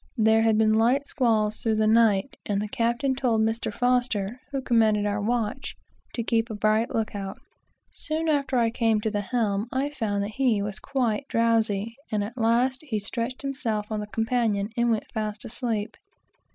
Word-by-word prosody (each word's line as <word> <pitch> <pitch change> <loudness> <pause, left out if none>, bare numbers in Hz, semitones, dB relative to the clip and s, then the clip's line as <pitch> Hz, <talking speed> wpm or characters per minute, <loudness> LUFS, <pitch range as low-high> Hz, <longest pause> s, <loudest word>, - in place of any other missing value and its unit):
There 220 0 +4
had 225 -1 +3
been 215 0 +4
light 240 +6 +3
squalls 220 -6 +1
through 225 -1 +1
the 215 0 +2
night, 220 0 +3
and 200 -1 0
the 210 - -2
captain 240 +3 0
told 245 -4 +1
Mr. 225 +1 0
F, 245 -2 0
who 275 - -1
commanded 220 -5 +2
our 205 0 -1
watch, 225 0 -2 0.4
to 235 - -2
keep 230 +1 +1
a 220 - -4
bright 215 +2 +2
look 225 -1 -2
out. 195 -1 -5 0.5
Soon 320 +1 -2
after 280 -4 +1
I 230 -1 +2
came 225 -2 +2
to 220 - -1
the 205 -1 -1
helm, 210 -1 -1
I 275 +2 -1
found 215 -7 -1
that 200 - -3
he 240 -2 +1
was 205 0 -5
quite 265 -1 -1
drowsy, 230 -2 +1
and 210 -1 0
at 215 +4 -6
last 245 +3 +2
he 265 -9 -3
stretched 235 +5 -4
himself 230 -7 -3
on 215 - -1
the 210 - -5
companion 225 -2 0
and 235 0 +2
went 225 -2 0
fast 215 -1 -4
asleep. 220 -2 -3
225 Hz, 185 wpm, -26 LUFS, 215-245 Hz, 0.5 s, There